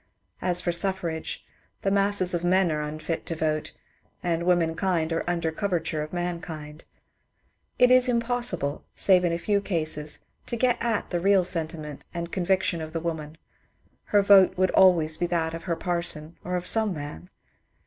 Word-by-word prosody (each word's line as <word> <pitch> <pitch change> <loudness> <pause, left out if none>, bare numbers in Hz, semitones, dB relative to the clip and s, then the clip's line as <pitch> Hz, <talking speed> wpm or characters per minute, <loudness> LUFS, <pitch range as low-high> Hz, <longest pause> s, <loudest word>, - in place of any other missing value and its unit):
As 180 -1 +3
for 175 - 0
suffrage, 170 -3 -2 0.4
the 195 - +1
masses 200 -2 +3
of 175 -1 -1
men 185 0 +3
are 150 -1 -1
unfit 155 +2 -4
to 165 - -3
vote, 155 -1 -1 0.5
and 170 0 -1
womenkind 170 -1 +1
are 165 - -1
under 170 -2 -1
coverture 170 -3 -2
of 150 - -6
mankind. 165 -3 -5 0.9
It 250 0 +5
is 255 0 +5
impossible, 235 - 0
save 185 -2 +4
in 175 - +1
a 170 - 0
few 200 +3 0
cases, 155 -5 -2 0.3
to - - -3
get 245 0 +1
at 230 -3 -1
the 175 - 0
real 195 +1 +4
sentiment 160 -4 -3
and 170 0 -4
conviction 185 -2 0
of 155 0 -7
the 165 - -1
woman: 160 -2 -5 0.7
her 205 -1 +3
vote 195 -2 +6
would 185 0 +2
always 165 -5 +4
be 175 - -1
that 165 -2 -1
of 165 - -7
her 170 -2 -1
parson 170 -2 -3
or 180 +1 -3
of 180 0 -3
some 215 0 +3
man. 120 - -8
175 Hz, 170 wpm, -26 LUFS, 160-190 Hz, 0.9 s, vote